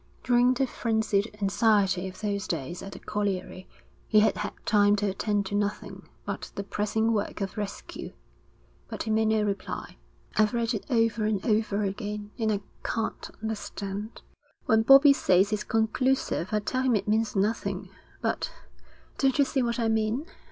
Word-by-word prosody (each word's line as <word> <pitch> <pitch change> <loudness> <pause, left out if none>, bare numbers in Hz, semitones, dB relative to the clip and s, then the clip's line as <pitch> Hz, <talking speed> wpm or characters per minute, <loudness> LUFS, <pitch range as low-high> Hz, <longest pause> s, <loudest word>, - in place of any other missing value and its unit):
During 245 0 +4
the 270 - +2
frenzied 220 -3 -1
anxiety 195 -2 +2
of 185 +1 -10
those 200 -2 -2
days 170 +2 -4
at 195 - -8
the - - -8
colliery, 195 -2 -3 0.4
he 215 -1 +5
had 215 - +2
had - - -3
time 205 -1 +4
to 205 0 -1
attend 200 +1 0
to 195 - -6
nothing 205 0 -3 0.2
but - - -5
the 200 - -3
pressing 210 +3 0
work 210 -1 -2
of 195 -2 -3
rescue. 205 -2 -6 0.8
But - - -5
he 220 - -2
made 220 0 +3
no 220 -1 +2
reply. 200 -1 -4 0.4
'I've 215 +2 +3
read 235 0 0
it 215 - -4
over 225 -3 +2
and 210 -3 -1
over 210 -2 +1
again, 205 +1 -4
and 220 -1 +1
I 205 -1 -1 0.2
can't 225 -2 -3
understand. 210 -1 -5 0.4
When 220 0 +4
Bobbie 275 +4 +8
says 195 -4 +3
it's 210 - -1
conclusive, 225 -3 +1
I 210 -1 +1
tell 255 +5 -1
him 260 -3 +3
it 205 - -1
means 220 +1 +1
nothing 210 +4 -1 0.3
but - - -1 0.7
don't 270 -2 +3
you 285 - +5
see 270 - 0
what 235 -1 0
I 230 -2 +1
mean? 220 +5 0
215 Hz, 170 wpm, -27 LUFS, 200-225 Hz, 0.8 s, Bobbie